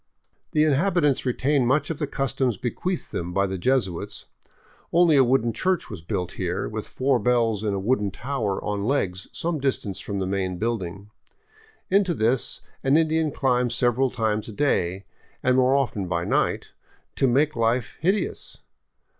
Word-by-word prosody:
The 150 Hz, -, +4 dB
inhabitants 150 Hz, -2 st, +2 dB
retain 130 Hz, +1 st, +1 dB
many 140 Hz, +3 st, +3 dB
of 160 Hz, -, -5 dB
the 150 Hz, -, -1 dB
customs 135 Hz, -4 st, -1 dB
bequeathed 175 Hz, -, -3 dB
them 85 Hz, +1 st, -4 dB
by 100 Hz, +2 st, +2 dB
the 95 Hz, -1 st, -4 dB
Jesuits. 115 Hz, -6 st, -1 dB, 0.7 s
Only 170 Hz, -2 st, +5 dB
a 135 Hz, -, +6 dB
wooden 120 Hz, -2 st, +2 dB
church 185 Hz, -8 st, -1 dB
was 95 Hz, -6 st, -7 dB
built 90 Hz, +1 st, -3 dB
here, 90 Hz, -1 st, -2 dB
with 110 Hz, 0 st, -5 dB
four 130 Hz, -1 st, +1 dB
bells 115 Hz, -2 st, +1 dB
in 105 Hz, -2 st, 0 dB
a -, -, -1 dB
wooden 105 Hz, 0 st, +1 dB
tower 115 Hz, -3 st, -2 dB
on 105 Hz, -1 st, -2 dB
legs 95 Hz, -9 st, -1 dB
some 165 Hz, -2 st, -2 dB
distance 130 Hz, -8 st, -1 dB
from 100 Hz, -, -4 dB
the 95 Hz, -, -1 dB
main 95 Hz, -1 st, -2 dB
building. 100 Hz, -2 st, -3 dB, 0.8 s
Into 190 Hz, -3 st, +3 dB
this 120 Hz, +2 st, 0 dB, 0.2 s
an 135 Hz, +3 st, +4 dB
Indian 160 Hz, -1 st, +2 dB
climbs 125 Hz, -3 st, +1 dB
several 125 Hz, +2 st, +2 dB
times 110 Hz, -2 st, -1 dB
a -, -, -8 dB
day, 95 Hz, -7 st, 0 dB, 0.4 s
and 125 Hz, 0 st, +3 dB
more 130 Hz, +1 st, +4 dB
often 110 Hz, -8 st, 0 dB
by 85 Hz, -1 st, -1 dB
night, -, -, 0 dB, 0.5 s
to 135 Hz, -, +3 dB
make 145 Hz, +5 st, +2 dB
life 115 Hz, +1 st, 0 dB
hideous. 190 Hz, +5 st, -1 dB
125 Hz, 165 wpm, -24 LUFS, 100-140 Hz, 0.8 s, a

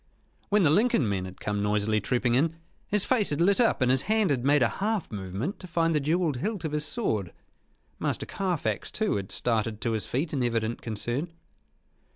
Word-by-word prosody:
When 205 Hz, -1 st, +4 dB
the 150 Hz, -, +5 dB
Lincoln 200 Hz, -, +3 dB
men 95 Hz, -2 st, -1 dB
had 95 Hz, 0 st, -10 dB
come 105 Hz, -1 st, -2 dB
noisily 105 Hz, +1 st, +1 dB
trooping 125 Hz, +3 st, +1 dB
in, 155 Hz, +6 st, +2 dB, 0.3 s
his 205 Hz, -2 st, 0 dB
face 235 Hz, -6 st, +2 dB
had 145 Hz, -, -1 dB
lit 195 Hz, +7 st, +4 dB
up 230 Hz, -, +2 dB
and 125 Hz, -, +3 dB
his 130 Hz, 0 st, +3 dB
hand 215 Hz, -6 st, +3 dB
had 125 Hz, -3 st, 0 dB
made 145 Hz, 0 st, +4 dB
a -, -, +5 dB
half 210 Hz, -2 st, -1 dB
movement 100 Hz, -, -4 dB
to 185 Hz, -, -9 dB
find 165 Hz, -1 st, +1 dB
the 150 Hz, -, +3 dB
jewelled 155 Hz, 0 st, +1 dB
hilt 205 Hz, -, -3 dB
of 155 Hz, -, -2 dB
his 150 Hz, 0 st, -1 dB
sword. 110 Hz, -, -2 dB, 0.7 s
Master -, -, -1 dB
Carfax, 185 Hz, -5 st, -2 dB
too, 215 Hz, -, 0 dB
had 95 Hz, -1 st, -5 dB
started 115 Hz, -2 st, -1 dB
to 115 Hz, -, 0 dB
his 110 Hz, -2 st, -2 dB
feet 150 Hz, +6 st, -2 dB
in 135 Hz, -, 0 dB
evident 115 Hz, -1 st, -1 dB
concern. 120 Hz, +9 st, -3 dB
140 Hz, 200 wpm, -27 LUFS, 110-180 Hz, 0.7 s, the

